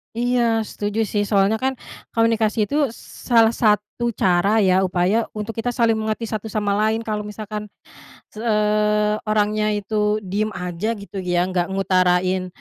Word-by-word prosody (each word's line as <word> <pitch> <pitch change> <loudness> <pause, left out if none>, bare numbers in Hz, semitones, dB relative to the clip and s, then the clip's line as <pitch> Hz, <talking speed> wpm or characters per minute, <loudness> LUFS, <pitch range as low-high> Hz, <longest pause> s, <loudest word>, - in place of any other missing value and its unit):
Iya, 240 -1 +1
setuju, 210 +1 -3
sih. 205 +1 0
Soalnya 200 0 +2
kan 260 +4 0 0.4
komunikasi 225 -1 +1
itu 285 - -3 0.5
salah 230 -2 +4
satu 210 +2 +1
cara 195 +1 +2
ya, 190 -2 +3
upaya 185 +4 +1
untuk 215 +1 -5
kita 235 +2 -2
saling 230 -2 +2
mengerti 220 +1 -2
satu 215 0 -5
sama 205 -1 0
lain, 215 +2 +1
kalau 215 -2 -3
misalkan, 210 0 -7 0.6
eee, 210 -1 +1
orangnya 215 0 +1
itu 210 +1 -1
diem 200 +3 -1
aja, 180 +5 -3
gitu 200 -1 -8
ya, 175 -1 0
enggak 180 -1 -1
ngutarain, 185 -1 +1
210 Hz, 145 wpm, -21 LUFS, 195-220 Hz, 0.6 s, salah